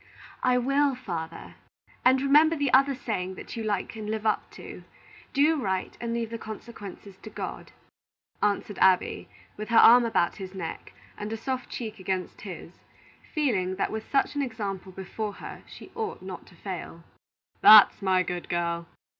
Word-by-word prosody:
"I 250 0 +3
will, 275 +2 +2
father, 170 -9 -6 0.5
and 260 +1 +5
remember 300 +4 +5
the 285 -4 -1
other 275 +1 +5
saying 190 -7 -3
that - - -9
you 225 - -4
like 210 0 -2
and 215 -1 -6
live 220 0 -3
up 215 - 0
to, - - -10 0.5
'Do 300 +1 +3
right 190 -4 -2
and 235 -1 -3
leave 230 -1 -2
the 230 - -5
consequences 210 -3 -9
to 215 - -11
God,'" - - -7 0.7
answered 205 0 -1
Abby, 185 -1 +3 0.3
with 215 +2 -6
her 230 - +3
arm 245 +1 +8
about 225 -7 +1
his 190 -1 -8
neck, 165 -4 -6 0.3
and 210 +1 -5
a 225 - -3
soft 255 +2 -4
cheek 220 -3 -6
against 185 -1 -3
his, 180 -3 -8 0.6
feeling 200 -12 0
that 195 - -1
with 220 0 -5
such 275 - +2
an 290 - -1
example 205 -7 -4
before 195 +3 -5
her - - -9
she - - -12
ought 445 -2 -4
not - - -8
to - - -17
fail. - - -7 0.6
"That's 215 -1 +9
my 185 -1 +3
good 180 -1 -5
girl! 170 -1 -1
215 Hz, 170 wpm, -27 LUFS, 190-250 Hz, 0.7 s, That's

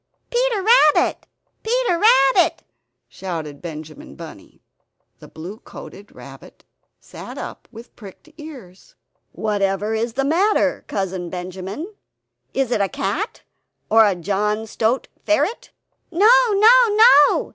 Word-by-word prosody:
Peter 480 -4 0
Rabbit, 430 -9 +3 0.3
Peter 460 -6 0
Rabbit!" 270 - +3 0.4
shouted 160 -6 -7
Benjamin 155 - -10
Bunny. - - -13 0.6
The - - -13
blue 180 +7 -10
coated - - -13
rabbit - - -14 0.3
sat - - -11
up - - -8
with 230 +1 -14
pricked 200 +6 -14
ears 260 - -13 0.4
"Whatever 205 0 -2
is 225 +1 -2
the 270 +2 -1
matter, 370 +9 +1
Cousin 190 -3 -4
Benjamin? 190 - -7 0.6
Is 265 -2 -2
it 215 - 0
a 195 - 0
cat? 355 - -4 0.5
or 215 -3 +5
John 210 +4 -2
Stoat 225 +3 -1 0.2
Ferret?" 345 +9 -1 0.4
"No, 400 +7 +4 0.2
no, 415 +3 +5 0.3
no! 435 -10 +5
225 Hz, 115 wpm, -20 LUFS, -, 0.6 s, or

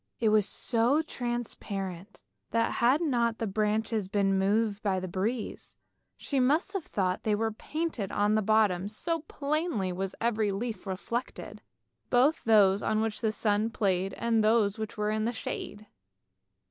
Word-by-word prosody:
It 225 - +3
was 210 -2 +3
so 245 +6 +2
transparent, 205 - -5 0.3
that 230 0 +1
had 255 +7 +4
not 235 -7 +1
the 225 - -2
branches 215 0 0
been 195 -1 +1
moved 210 +1 +1
by 195 -3 0
the 185 - -5
breeze, 210 +6 -3 0.4
she 275 - -2
must 305 +10 +2
have 390 -4 -2
thought 185 -2 0
that - - -43
they 215 -1 +2
were 220 +1 0
painted 260 - -4
on 205 +1 +2
the 215 - +3
bottom, 205 -3 +2
so 330 +11 -2
plainly 295 - -2
was 190 +1 -4
every 220 -2 +1
leaf 215 +2 -4
reflected, 230 +6 -5 0.5
both 265 +6 +3
those 205 -3 +5
on 215 - 0
which 220 +1 -2
the 220 -2 +1
sun 215 0 0
played 195 -4 0
and 230 -2 +1
those 215 -1 +3
which 220 0 -5
were 210 0 0
in 215 +2 0
shade. 215 -1 -6
215 Hz, 160 wpm, -29 LUFS, 200-235 Hz, 0.5 s, those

